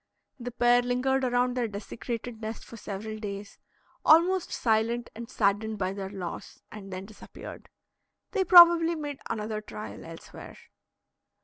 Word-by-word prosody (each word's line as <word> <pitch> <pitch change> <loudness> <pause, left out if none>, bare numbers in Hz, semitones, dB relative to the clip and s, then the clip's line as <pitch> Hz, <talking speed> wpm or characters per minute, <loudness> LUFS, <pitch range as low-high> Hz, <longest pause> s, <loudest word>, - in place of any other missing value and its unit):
The 245 0 -5
pair 245 0 +4
lingered 255 +2 0
around 245 0 +1
their 245 -2 0
desecrated 225 +3 -6
nest 220 +1 -6
for - - -11
several 215 0 -6
days, 200 -1 -7 0.4
almost 345 +3 +4
silent, 230 +1 0
and 230 +1 -8
saddened 215 -1 0
by 190 -1 -2
their 195 -1 -5
loss, 185 -4 -7
and 200 -2 -10
then 185 +1 -6
disappeared. 210 +1 -11 0.6
They 390 - +1
probably 340 -2 +8
made 290 -3 -5
another 215 -1 -3
trial 210 0 -8
elsewhere. 165 0 -11
225 Hz, 135 wpm, -28 LUFS, 205-250 Hz, 0.6 s, probably